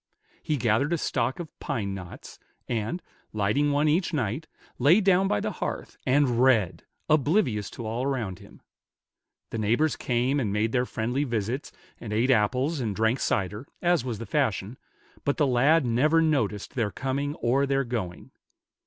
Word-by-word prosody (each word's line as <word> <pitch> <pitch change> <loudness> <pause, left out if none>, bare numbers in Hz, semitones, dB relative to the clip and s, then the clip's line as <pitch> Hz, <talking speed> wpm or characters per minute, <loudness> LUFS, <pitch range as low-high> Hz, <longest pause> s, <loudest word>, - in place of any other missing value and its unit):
He 150 - -1
gathered 120 +6 +1
a - - +2
stock 130 -2 -1
of 165 -4 -8
pine 100 -3 -3
knots, 90 -3 -9 0.3
and, 115 - -2 0.3
lighting 110 +8 +1
one 145 +2 +2
each 170 +4 +1
night, 130 +4 -2 0.3
lay 145 - +6
down 195 -1 +3
by 105 - +1
the - - -2
hearth, - - -5
and 130 -3 +3
read, 120 -8 +3 0.2
oblivious 145 - +2
to 115 - -8
all 115 +3 -2
around 115 -9 -2
him. 100 - -16 0.9
The 115 - -3
neighbors 120 +8 +2
came 125 +3 0
and 110 -7 -1
made 105 +2 0
their 125 0 +1
friendly 125 +5 -1
visits, 120 +1 -2 0.3
and 110 - -7
ate 115 +5 +2
apples 130 +7 +1
and 110 -5 -2
drank 110 +4 +1
cider, 105 +4 -1
as 175 -5 +2
was 120 -4 -3
the 115 - -6
fashion, 110 -2 -1 0.4
but 140 - 0
the 150 - +3
lad 140 +4 +4
never 140 +8 +3
noticed 130 -11 0
their 115 -6 0
coming 135 +6 -2
or 135 +2 +1
their 135 0 +1
going. 110 -8 -5
125 Hz, 165 wpm, -26 LUFS, 110-145 Hz, 0.9 s, lay